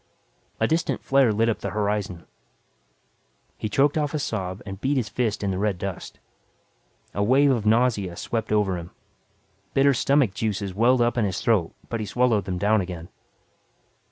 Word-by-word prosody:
A - - +2
distant 160 +2 -1
flare 135 -4 +4
lit 110 +2 +1
up 115 - 0
the - - -4
horizon. 100 -5 -2 1.3
He 110 - -4
choked 140 +7 +2
off 150 0 -1
a - - +1
sob, 95 -9 -3
and 95 -1 -8
beat 140 +1 +1
his 115 -5 -1
fist 110 -2 -1
in 100 - 0
the 95 - -2
red 105 -2 0
dust. 95 0 -6 0.9
A 100 - -2
wave 135 +6 +4
of 115 -5 0
nausea 110 -6 +2
swept 110 +3 -3
over 100 -4 +1
him. 85 0 -9 0.9
Bitter 140 0 +5
stomach 135 -4 +2
juices 100 -2 -2
welled 120 +5 +3
up 120 +1 +2
in 110 - +2
his 95 -2 -2
throat 105 -8 +1
but 115 - -3
he 105 - -4
swallowed 115 -2 +1
them 90 -2 -3
down 105 +2 +2
again. 90 -2 -7
105 Hz, 175 wpm, -24 LUFS, 95-125 Hz, 1.3 s, Bitter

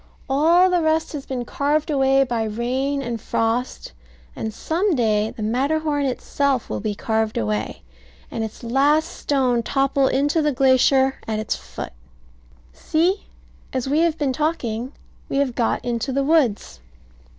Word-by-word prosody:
All 325 +7 +4
the 355 -1 +2
rest 315 0 +1
has 285 -3 -6
been 250 -2 -3
carved 295 +5 0
away 270 -1 +4
by 240 -3 -2
rain 260 +6 -1
and 235 -3 -4
frost; 230 +3 -2 0.4
and 220 - -4
some 340 - 0
day 215 -3 +1
the 220 - -7
Matterhorn 290 +5 0
itself 265 0 -1
will - - -2
be 210 0 -3
carved 220 +1 -1
away, 105 0 -2 0.5
and 225 - -3
its 220 +1 -7
last 285 +7 +2
stone 255 -4 +1
topple 270 +2 +1
into 290 +5 +1
the 300 -1 +2
glacier 265 0 +3
at 220 -1 -1
its 215 0 -2
foot. - - -8 0.8
See, 345 - 0 0.5
as 260 -1 -2
we 290 +3 +2
have 330 -1 +2
been 280 -3 0
talking, 260 -6 -2 0.4
we - - -1
have 275 -3 +1
got 235 -1 -1
into 240 +2 -2
the 275 +1 0
woods. 270 - +1
270 Hz, 150 wpm, -22 LUFS, 235-295 Hz, 0.8 s, All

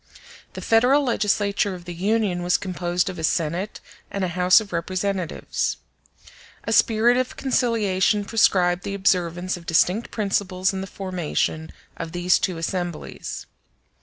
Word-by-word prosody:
The - - -7
Federal 250 +6 +4
legislature 205 -4 0
of 175 -1 -11
the 175 - -6
Union 195 0 0
was 175 0 +2
composed 180 -2 -2
of 185 -2 -5
a - - -5
Senate 170 +5 -1 0.3
and 200 - -3
a 185 - 0
House 180 +2 +5
of 210 -4 -8
Representatives. 185 +1 -2 0.9
A - - -1
spirit 235 +2 +4
of 255 0 -2
conciliation 215 -6 +1
prescribed 180 -5 +3
the 200 +2 -4
observance 180 -1 0
of 170 - -14
distinct 180 +7 +2
principles 195 -3 -1
in 190 - -3
the 195 - -5
formation 175 -4 -3 0.3
of 165 0 -6
these 175 +1 +2
two 185 -3 -1
assemblies. 175 0 -4
185 Hz, 140 wpm, -23 LUFS, 175-205 Hz, 0.9 s, House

